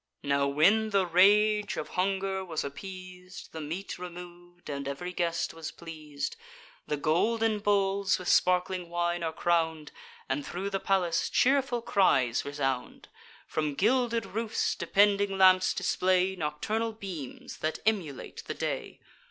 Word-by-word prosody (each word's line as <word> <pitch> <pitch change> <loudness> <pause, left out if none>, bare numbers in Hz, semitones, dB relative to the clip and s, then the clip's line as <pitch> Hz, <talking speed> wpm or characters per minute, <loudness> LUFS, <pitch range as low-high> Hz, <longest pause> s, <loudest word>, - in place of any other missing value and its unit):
Now, 140 0 +2
when 195 +10 +3
the 195 -3 +2
rage 205 +4 +4
of - - -4
hunger 190 +1 -1
was 165 -4 -3
appeas'd, 185 +4 -9
The 160 - -6
meat 170 +6 -5
remov'd, 175 0 -10
and 140 -1 -4
ev'ry 180 +6 -5
guest 170 -1 -1
was 165 -1 -6
pleas'd, 155 -4 -6 0.5
The 150 - -1
golden 215 +9 +1
bowls 200 -1 +2
with 180 - -8
sparkling 180 -1 +2
wine 175 0 -1
are 165 -1 -1
crown'd, 160 -2 0 0.4
And 290 - -1
thro' 195 -4 -4
the 195 -1 -2
palace 180 -4 +1
cheerful 260 -3 +2
cries 135 - +2
resound. 135 -3 -3 0.4
From 150 -2 -2
gilded 235 - +2
roofs 225 0 -1
depending 200 -1 +2
lamps 185 0 +6
display 185 +1 +1
Nocturnal 200 +8 -2
beams, 185 - -8
that 155 0 -1
emulate 180 -11 -2
the - - -4
day. - - -4
180 Hz, 135 wpm, -29 LUFS, 160-200 Hz, 0.5 s, lamps